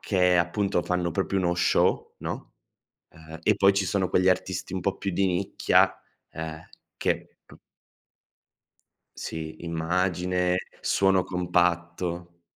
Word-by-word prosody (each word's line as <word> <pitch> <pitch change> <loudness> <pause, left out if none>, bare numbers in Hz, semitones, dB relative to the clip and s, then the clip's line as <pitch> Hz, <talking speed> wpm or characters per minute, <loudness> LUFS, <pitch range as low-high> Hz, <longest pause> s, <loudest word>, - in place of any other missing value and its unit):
che, 90 -2 +3
appunto, 90 +2 +1
fanno 90 -1 -1
proprio 95 +3 -1
uno 85 -1 +1
show, 85 - +1
no, - - -6 0.6
uhm 80 0 -12
e 105 - +4
poi 100 0 +5
ci 100 0 +1
sono 95 0 0
quegli 95 +1 +3
artisti 95 0 -1
un 95 - -2
po' 95 +2 -1
più 100 - -2
di 95 +2 +2
nicchia, 95 +1 +2 0.4
ehm, 80 -1 -6 0.4
che - - -2
p - - -16 1.6
Sì, 80 -1 -6
immagine, 90 +2 0 0.2
suono 95 -1 +2
compatto. 85 -1 -1
90 Hz, 125 wpm, -26 LUFS, 85-95 Hz, 1.6 s, poi